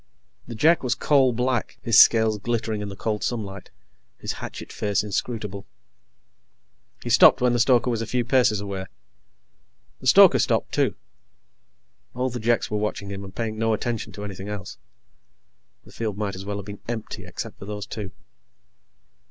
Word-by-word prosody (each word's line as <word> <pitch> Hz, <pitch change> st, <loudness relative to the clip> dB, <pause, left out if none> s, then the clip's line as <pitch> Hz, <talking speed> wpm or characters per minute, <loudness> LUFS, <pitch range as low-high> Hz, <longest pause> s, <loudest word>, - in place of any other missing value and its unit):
The 120 Hz, -, -7 dB
Jek 160 Hz, +9 st, +4 dB
was 125 Hz, -2 st, 0 dB
coal 135 Hz, -4 st, +3 dB
black, 125 Hz, 0 st, -1 dB
his 115 Hz, +1 st, +5 dB
scales 110 Hz, -2 st, +6 dB
glittering 110 Hz, -1 st, -2 dB
in 100 Hz, -, -5 dB
the 100 Hz, -, -8 dB
cold 105 Hz, 0 st, -3 dB
sunlight, 100 Hz, -5 st, -4 dB, 0.5 s
his -, -, -4 dB
hatchet -, -, -8 dB
face 105 Hz, -1 st, 0 dB
inscrutable. 105 Hz, -1 st, -4 dB, 1.4 s
He -, -, -3 dB
stopped -, -, +7 dB
when 125 Hz, -1 st, +2 dB
the 120 Hz, -, +1 dB
stoker 125 Hz, 0 st, +3 dB
was 115 Hz, -1 st, -1 dB
a 115 Hz, -, -4 dB
few 125 Hz, -1 st, -1 dB
paces 125 Hz, -4 st, +3 dB
away. 100 Hz, -2 st, -5 dB, 1.1 s
The -, -, -5 dB
stoker -, -, +7 dB
stopped, -, -, 0 dB
too. -, -, +1 dB, 1.2 s
All 130 Hz, +1 st, -1 dB
the 120 Hz, -, -4 dB
Jeks 115 Hz, 0 st, +1 dB
were 105 Hz, -, 0 dB
watching 105 Hz, -1 st, -3 dB
him 100 Hz, 0 st, -6 dB
and 95 Hz, -1 st, -11 dB
paying 110 Hz, -2 st, -3 dB
no 115 Hz, 0 st, +2 dB
attention 115 Hz, +1 st, -4 dB
to 105 Hz, -, -7 dB
anything 100 Hz, 0 st, -7 dB
else. 100 Hz, -2 st, -7 dB, 1.1 s
The -, -, -16 dB
field 110 Hz, -3 st, -4 dB
might 105 Hz, -2 st, -2 dB
as 95 Hz, +1 st, -8 dB
well 100 Hz, 0 st, -3 dB
have 100 Hz, -, -7 dB
been 100 Hz, 0 st, -9 dB
empty 115 Hz, -2 st, -5 dB
except -, -, -7 dB
for -, -, -9 dB
those 105 Hz, 0 st, -5 dB
two. 105 Hz, -3 st, -6 dB
110 Hz, 170 wpm, -24 LUFS, 100-120 Hz, 1.4 s, stopped